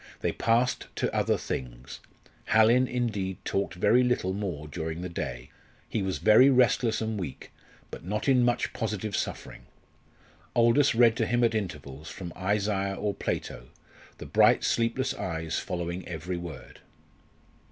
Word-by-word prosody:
They - - 0
passed 120 +2 +1
to - - -1
other - - +2
things. 60 0 -6 0.5
Hallin, 115 +4 +4
indeed, 105 -7 -2
talked 90 -4 -1
very 120 +8 +4
little 125 -7 0
more 90 -7 -4
during 80 +2 -5
the 90 - -4
day. 60 -7 -5 0.4
He 110 - -2
was 95 -1 -2
very 110 +5 +6
restless 125 -3 +3
and 110 -1 -2
weak, 75 -8 -7 0.4
but - - -8
not 105 +7 -3
in 130 -3 +4
much 120 0 0
positive 110 -2 -3
suffering. - - -5 0.9
Aldous 120 +3 +4
read 115 -1 +5
to 115 - 0
him 120 +1 +1
at 115 -1 +3
intervals, 75 -7 -5
from 85 -3 -7
Isaiah 100 0 -1
or 100 +1 -2
Plato, - - -4 0.5
the - - -9
bright - - +4
sleepless 115 +3 0
eyes 80 -2 -3
following 85 +1 -4
every 85 +1 -4
word. 85 -6 -9
100 Hz, 145 wpm, -28 LUFS, 85-115 Hz, 0.9 s, very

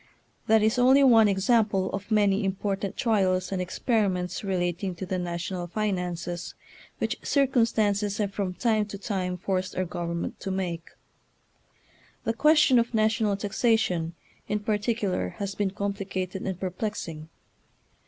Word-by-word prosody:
That 220 0 +5
is 220 +3 +2
only 265 +3 +6
one 225 -5 +7
example 200 -1 +2
of 200 +2 -5
many 205 -1 +3
important 195 0 -2
trials 190 -6 +1
and 190 -1 -1
experiments 185 -1 -1
relating 180 -1 -1
to 190 - -5
the 185 0 -2
national 175 +1 -3
finances 180 -3 -3 0.4
which - - -2
circumstances 220 -7 +2
have 200 -2 -1
from 195 -3 -2
time 215 -2 +1
to 200 - -7
time 185 -3 -2
forced 185 0 -2
our 185 - 0
government 170 -1 -4
to 195 - -5
make. 175 -3 -3 1.3
The 225 - 0
question 300 -1 +5
of 235 0 -1
national 215 -2 +2
taxation, 195 -5 0 0.3
in 210 0 -1
particu 210 0 0
lar, 90 - -1
has 200 -1 -3
been 200 0 0
complicated 195 -2 -4
and 185 -2 -3
perplexing. 180 -4 -4
195 Hz, 135 wpm, -27 LUFS, 185-215 Hz, 1.3 s, one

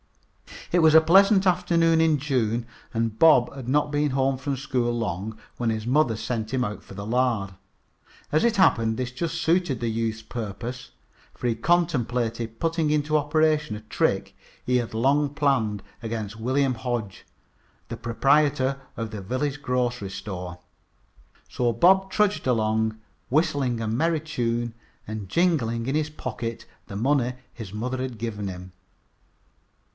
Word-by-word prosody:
It 175 - +4
was 160 -1 +6
a 160 - +10
pleasant 195 +4 +5
afternoon 170 -3 +3
in 160 -2 +4
June, 120 -5 0 0.3
and 115 -1 -1
Bob 150 -7 +6
had 135 -3 -8
not 145 +2 +1
been 145 -1 +1
home 135 0 +1
from 135 +1 -2
school 125 -3 -1
long 105 0 -3 0.2
when 120 -2 0
his 110 -1 -2
mother 130 -2 +2
sent 110 0 -3
him 130 -1 +1
after 105 -3 -6
the 100 +1 -6
lard. 115 -4 0 0.8
As 155 - +3
it 235 -1 +2
happened, 115 - +3
this 125 -1 -3
just 160 +6 -3
suited 165 -7 +1
the 120 - -1
youth's 110 0 -2
purpose, 120 +3 -6 0.4
for 125 - -3
he 115 - +1
contemplated 120 -6 0
putting 165 -2 0
into 150 0 +2
operation 150 -3 +1
a 105 - -8
trick 110 - -1 0.3
he 125 0 +2
had 120 -3 -3
long 140 +6 +2
planned 120 -9 +1 0.2
against 115 -1 -5
William 130 +3 +1
Hodge, 115 -4 -4 0.6
the - - -5
proprietor 135 +3 +2 0.2
of 115 -1 -4
the 105 -2 -6
village 135 +8 -2
grocery 125 -5 -1
store. 90 -3 -6 0.9
So 120 -1 0
Bob 190 - +4
trudged 205 -5 +1
along, 110 -2 +1 0.3
whistling 135 -5 +1
a 110 - -2
merry 155 +7 +1
tune 120 -6 -2 0.3
and 105 -3 -6
jingling 120 - +1
in 135 +3 -1
his 155 0 0
pocket 115 -5 -5 0.2
the 100 - -8
money 125 +2 +1 0.2
his 110 -5 -8
mother 125 +5 -3
had 130 -2 -4
given 105 -3 -4
him. 90 0 -7
125 Hz, 150 wpm, -25 LUFS, 110-150 Hz, 0.9 s, a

